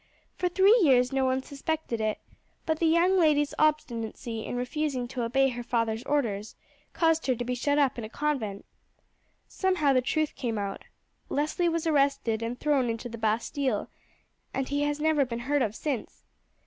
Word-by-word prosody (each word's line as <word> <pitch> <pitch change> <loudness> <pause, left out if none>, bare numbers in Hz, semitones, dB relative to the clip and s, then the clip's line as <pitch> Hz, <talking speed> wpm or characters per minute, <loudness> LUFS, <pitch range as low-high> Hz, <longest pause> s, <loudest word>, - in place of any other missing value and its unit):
For 360 - 0
three 390 +6 +5
years 255 -5 +4
no 270 -1 +2
one 260 0 0
suspected 280 -4 -3
it; 215 -1 0 0.5
but 315 -1 0
the 330 - +3
young 350 +4 +4
lady's 295 -3 +3
obstinacy 235 -6 -1
in - - -5
refusing 255 0 -2
to 255 -1 -4
obey 270 +3 +2
her 245 -1 -5
father's 230 -2 -1
orders 225 -8 -1 0.4
caused 325 -2 +1
her 255 - +2
to 245 +1 -4
be 250 - -1
shut 285 +4 0
up 275 -4 +2
in - - -5
a 215 - -6
convent. 235 -8 -2 0.8
Somehow 365 -7 +1
the 255 - +3
truth 310 +4 0
came 230 -4 -3
out. 200 -1 -4 0.4
Leslie 310 +4 0
was 330 -1 -2
arrested 275 -7 +1
and 235 +2 -4
thrown 280 -5 +2
into 230 +2 -4
the 230 -1 -8
Bastille, 225 +2 -1 0.6
and 270 -1 -2
he 285 +1 0
has 290 0 0
never 310 -2 +3
been 235 -2 -4
heard 285 +3 +1
of 215 -3 0
since. 275 -4 -4
270 Hz, 175 wpm, -28 LUFS, 235-300 Hz, 0.8 s, three